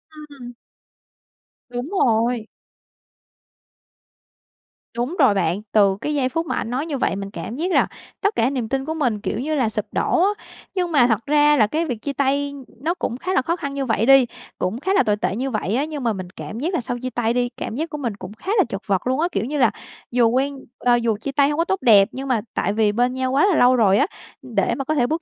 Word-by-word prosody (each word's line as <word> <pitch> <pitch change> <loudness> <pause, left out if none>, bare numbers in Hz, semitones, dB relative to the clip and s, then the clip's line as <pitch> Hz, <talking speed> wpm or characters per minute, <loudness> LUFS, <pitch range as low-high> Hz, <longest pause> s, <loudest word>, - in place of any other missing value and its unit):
Ưm, 305 - -10
ừm. 255 -4 -10 1.2
Đúng 245 +5 -5 0.2
rồi. 230 -1 +1 2.5
Đúng 250 +9 -2
rồi 260 -7 +6
bạn. 195 0 0
Từ 200 -3 +4
cái 300 - -2
giây 265 -3 +1
phút 330 +5 -2
mà - - -2
ảnh 225 - -3
nói 260 +5 -2
như 300 -4 -3
vậy 220 - 0
mình 195 0 -6
cảm 225 - -6
giác 345 +7 -2
là - - +3 0.3
tất 405 +1 +1
cả 230 - +2
niềm 250 -5 -3
tin 270 0 -1
của 315 - -2
mình, 245 -10 -1
kiểu 220 - -3
như 305 +4 -1
là, 250 -6 +1
sụp 210 -1 -3
đổ 350 - +1
á. 390 - +4 0.5
Nhưng 360 -2 -1
mà 260 -6 +5
thật 225 -1 0
ra 295 0 +4
là 215 - +4
cái 320 +9 -1
việc 250 -7 -3
chia 280 - -3
tay 280 +1 0 0.3
nó 335 - +1
cũng 245 -9 -4
khá 370 +7 -3
là - - +3
khó 335 +6 -1
khăn 280 -5 -5
như 275 -1 -2
vậy 225 -2 +1
đi, 270 -1 +7 0.3
cũng 185 +6 -2
khá 380 +7 0
là 400 - +4
tồi 210 -1 +2
tệ 200 - -1
như 260 +4 -2
vậy 215 -1 -1
á, 280 - +1
nhưng 300 -3 -6
mà 230 -2 +1
mình 185 -2 -6
cảm 215 +4 -8
giác 335 +7 -2
là 345 - 0
sau 245 +1 -4
chia 255 +1 -4
tay 235 -1 0
đi, 245 0 0
cảm 220 - -5
giác 320 +4 -3
của 300 - -5
mình 235 -8 -3
cũng 195 +1 -9
khá 370 - -5
là - - +6
chật 195 - -4
vật 195 +4 0
luôn 260 +3 +1
á, 340 - +2
kiểu 205 - -1
như 295 +3 -3
là, 245 -4 +4 0.4
dù 240 -1 +4
quen 270 +3 0 0.2
ờ, 245 -1 +3
dù 230 -3 0
chia 225 +6 -5
tay 280 0 +3
hổng 295 - -2
có 335 - +2
tốt 385 +1 -1
đẹp, 210 -6 +6
nhưng 270 +1 -6
mà 245 -4 +1
tại 200 - 0
vì 215 -1 +2
bên 245 +4 +1
nhau 260 0 -1
quá 275 +8 +4
là 375 - +2
lâu 250 -2 +5
rồi 205 -4 +4
á, - - +4 0.4
để 230 -7 -1
mà 275 - -3
có 310 +2 0
thể 245 -3 +2
bước 320 +2 -1
255 Hz, 255 wpm, -22 LUFS, 225-295 Hz, 2.5 s, đi